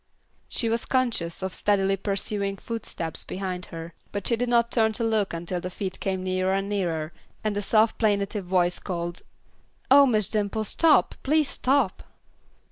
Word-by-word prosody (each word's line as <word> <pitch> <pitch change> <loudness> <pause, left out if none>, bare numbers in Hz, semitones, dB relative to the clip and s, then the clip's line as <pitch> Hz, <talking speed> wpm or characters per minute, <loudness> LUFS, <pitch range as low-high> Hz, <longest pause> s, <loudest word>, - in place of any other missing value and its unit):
She 230 - -1
was 230 +1 0
conscious 230 -10 0
of 190 -1 -3
steadily 195 -1 +2
pursuing 200 0 -2
footsteps 200 -7 -5
behind 185 -1 -4
her, 165 0 -8 0.2
but 200 -2 -4
she 235 - +3
did 245 +1 -1
not 235 -1 +3
turn 220 -2 +2
to 230 - -1
look 220 -3 +1
until 175 +1 -3
the 180 - -4
feet 185 +1 -5
came 190 -1 -2
nearer 185 0 0
and 195 0 -1
nearer 170 -6 -2 0.3
and 215 -1 -1
a 205 - -1
soft 220 +2 +2
plaintive 205 -2 0
voice 180 -1 +1
called, 175 -2 -4 0.7
"Oh, 280 0 +8
Miss 215 -5 +3
Dimple, 215 0 -1
stop, 310 +9 +3
please 305 +1 +2
stop." 275 +2 +1
200 Hz, 165 wpm, -26 LUFS, 185-225 Hz, 0.7 s, Oh